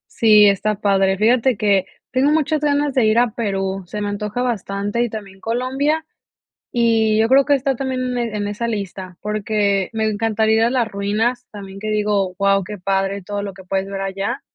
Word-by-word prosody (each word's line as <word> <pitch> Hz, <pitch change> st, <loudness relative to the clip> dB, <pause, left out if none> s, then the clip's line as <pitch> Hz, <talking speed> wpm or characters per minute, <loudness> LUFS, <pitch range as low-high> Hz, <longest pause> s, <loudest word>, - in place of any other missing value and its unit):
Sí, 210 Hz, -2 st, +6 dB
está 210 Hz, +2 st, 0 dB
padre. 195 Hz, -1 st, +2 dB
Fíjate 240 Hz, +2 st, +3 dB
que 200 Hz, -3 st, +2 dB, 0.3 s
tengo 265 Hz, +3 st, +2 dB
muchas 310 Hz, -1 st, +1 dB
ganas 290 Hz, -1 st, +1 dB
de 245 Hz, -4 st, +3 dB
ir 215 Hz, +2 st, +3 dB
a 245 Hz, -, +3 dB
Perú, 195 Hz, -4 st, -3 dB
se 210 Hz, +4 st, -6 dB
me 205 Hz, -, -2 dB
antoja 210 Hz, +3 st, -3 dB
bastante 205 Hz, -2 st, -1 dB
y 240 Hz, -, -2 dB
también 200 Hz, -3 st, -8 dB
Colombia. 265 Hz, +8 st, -1 dB, 0.7 s
Y 225 Hz, -2 st, +2 dB
yo 225 Hz, -, +3 dB
creo 270 Hz, +3 st, +5 dB
que 285 Hz, 0 st, +3 dB
está 270 Hz, 0 st, 0 dB
también 255 Hz, -1 st, -2 dB
en 235 Hz, -3 st, -2 dB
en 205 Hz, -1 st, -2 dB
esa 210 Hz, +3 st, -3 dB
lista, 190 Hz, -4 st, -5 dB
porque, 205 Hz, -2 st, 0 dB
me 220 Hz, 0 st, 0 dB
encantaría 220 Hz, +1 st, +1 dB
ir -, -, +3 dB
a 235 Hz, -, +3 dB
las 245 Hz, -3 st, +1 dB
ruinas, 220 Hz, +5 st, -1 dB
también 195 Hz, -2 st, -9 dB
que 215 Hz, +1 st, -4 dB
digo, 205 Hz, -3 st, 0 dB
guau, 195 Hz, 0 st, +2 dB
qué 205 Hz, +2 st, -7 dB
padre 195 Hz, +1 st, -1 dB
todo 205 Hz, +1 st, -4 dB
lo 200 Hz, -1 st, -5 dB
que 190 Hz, -, -12 dB
puedes 190 Hz, +1 st, -2 dB
ver 195 Hz, 0 st, -5 dB
allá 195 Hz, +6 st, -3 dB
215 Hz, 200 wpm, -20 LUFS, 200-240 Hz, 0.7 s, Sí